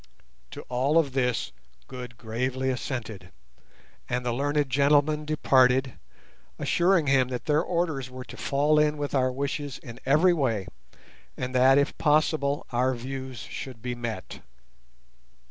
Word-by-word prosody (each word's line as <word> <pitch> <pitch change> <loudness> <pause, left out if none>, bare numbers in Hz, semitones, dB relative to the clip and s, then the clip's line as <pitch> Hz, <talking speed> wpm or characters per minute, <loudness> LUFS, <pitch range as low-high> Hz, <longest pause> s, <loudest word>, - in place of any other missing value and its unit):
To - - -9
all 130 +5 +1
of 155 -5 +3
this 125 - 0 0.4
Good 125 -3 -9
gravely 130 +4 -2
assented, 120 -5 -5 0.8
and 125 0 -2
the 120 - 0
learned 145 +3 0
gentlemen 145 +3 +2
departed, 130 -4 +3 0.6
assuring 175 -2 +2
him 135 -2 +3
that 125 -1 -5
their 150 0 +3
orders 165 -7 -2
were 130 0 -9
to 120 - -11
fall 145 +3 +2
in 150 0 +2
with 145 -1 -4
our 130 -2 +2
wishes 140 +1 -3
in 120 -3 -11
every 155 +7 +4
way, 120 - 0 0.7
and 125 0 -4
that, 130 +2 +5
if 140 0 +1
possible, 150 -2 +2
our 130 +2 +1
views 130 +1 -6
should 125 -4 -8
be 125 -1 -2
met. 120 -2 -6
130 Hz, 140 wpm, -26 LUFS, 125-145 Hz, 0.8 s, that